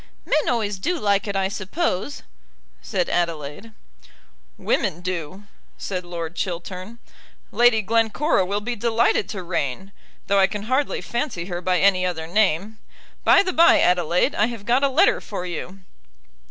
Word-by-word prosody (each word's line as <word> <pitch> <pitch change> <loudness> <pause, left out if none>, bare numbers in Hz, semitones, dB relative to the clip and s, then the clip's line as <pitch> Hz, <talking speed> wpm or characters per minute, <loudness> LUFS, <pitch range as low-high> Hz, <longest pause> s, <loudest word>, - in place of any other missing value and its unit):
"Men 305 - +1
always 210 -5 -1
do 350 - -1
like 200 -5 +1
it, 200 - -3
I 195 -1 +1
suppose," 200 - -3 0.6
said - - -1
Adelaide. 165 +4 -3 0.9
"Women 170 - -1
do," 185 +1 -5 0.3
said 185 -2 -4
Lord 170 -1 -6
Chiltern. 185 +5 -5 0.5
"Lady 235 -2 +4
Glencora 225 - +2
will 200 +3 -2
be 240 +3 -3
delighted 230 -2 +1
to 190 -4 -5
reign, 175 +2 -3 0.3
though 200 0 +2
I 190 - +5
can 205 0 -5
hardly 260 +5 0
fancy 235 - -3
her 175 -1 -5
by 180 0 +1
any 195 -2 +3
other 175 -3 -2
name. 205 +3 0 0.4
By - - +6
the 370 -2 -2
bye, 335 0 +6
Adelaide, 180 - +2
I 210 - +2
have 230 -4 -7
got 245 +4 +3
a 280 - +4
letter 325 +9 +3
for 195 -4 -6
you." 180 +2 -6
200 Hz, 155 wpm, -22 LUFS, 180-230 Hz, 0.9 s, By